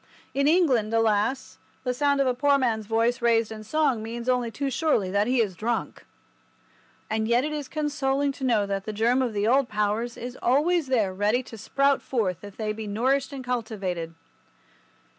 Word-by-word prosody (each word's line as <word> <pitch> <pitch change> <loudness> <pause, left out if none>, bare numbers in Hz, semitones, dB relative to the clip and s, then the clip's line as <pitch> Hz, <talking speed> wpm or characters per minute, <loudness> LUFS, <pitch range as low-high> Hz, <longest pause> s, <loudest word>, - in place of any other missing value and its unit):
In 280 +1 +1
England, 275 -11 +3
alas, 225 +4 0 0.2
the 250 - -1
sound 280 +2 +1
of 275 - +3
a 255 - +2
poor 280 +3 +3
man's 225 -5 -1
voice 230 +3 +1
raised 230 -2 +2
in 215 -1 -7
song 270 -1 +1
means 235 +2 -6
only 250 -2 +1
too 275 +5 -3
surely 245 - +1
that 200 +2 +1
he 255 0 +2
is 200 -5 -1
drunk. 230 +4 -3 1.0
And 220 0 -1
yet 240 +3 +2
it 305 - -3
is 295 -3 -4
consoling 285 -2 -1
to 270 - -10
know 230 -5 +2
that 195 0 -3
the 215 - -4
germ 235 +5 +2
of 245 -4 -1
the 205 0 0
old 260 +1 +3
powers 210 +3 -1
is 245 +1 -7
always 305 +5 +2
there 220 -8 +1
ready 210 +6 +1
to 235 - -11
sprout 275 +6 +1
forth 190 -8 -2
if 205 -1 -10
they 215 -1 -2
be 220 0 -6
nourished 260 +7 0
and 270 -2 -6
cultivated. 200 -9 -3
235 Hz, 190 wpm, -26 LUFS, 215-270 Hz, 1.0 s, England